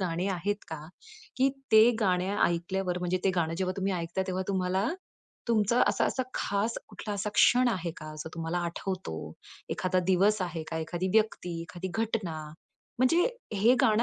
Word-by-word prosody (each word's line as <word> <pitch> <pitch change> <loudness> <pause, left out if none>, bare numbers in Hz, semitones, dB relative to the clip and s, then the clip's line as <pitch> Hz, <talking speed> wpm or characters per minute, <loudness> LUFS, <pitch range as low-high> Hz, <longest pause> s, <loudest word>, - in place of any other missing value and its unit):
गाणी 180 +1 -1
आहेत 205 +3 -2
का? 160 -2 -5 0.6
की 265 +1 +4 0.2
ते 220 +2 +8
गाणं 190 0 +1
ऐकल्यावर 180 +1 -1
म्हणजे 180 +1 0
ते 190 - +4
गाणं 165 -1 +1
जेव्हा 185 -1 0
तुम्ही 195 0 0
ऐकता 175 +1 -2
तेव्हा 185 0 -1
तुम्हाला 190 +2 +1 0.6
तुमचा 230 +1 +3
असा-असा 260 - +1
खास 205 +3 -1
कुठला 205 0 -6
असा 200 +1 -2
क्षण 250 0 +5
आहे 180 -6 -1
का 155 -1 -8
जो 160 - -5
तुम्हाला 165 +1 -2
आठवतो? 170 - -5 0.4
एखादा 185 0 0
दिवस 195 +3 +3
आहे 170 -3 -3
का, 160 - -2
एखादी 175 +3 -2
व्यक्ती, 180 -6 +1
एखादी 175 +2 -6
घटना? 215 -8 -1 0.6
म्हणजे 330 +8 +4 0.3
हे 225 +6 +5
गाणं 225 -3 +4
190 Hz, 160 wpm, -29 LUFS, 175-210 Hz, 0.6 s, ते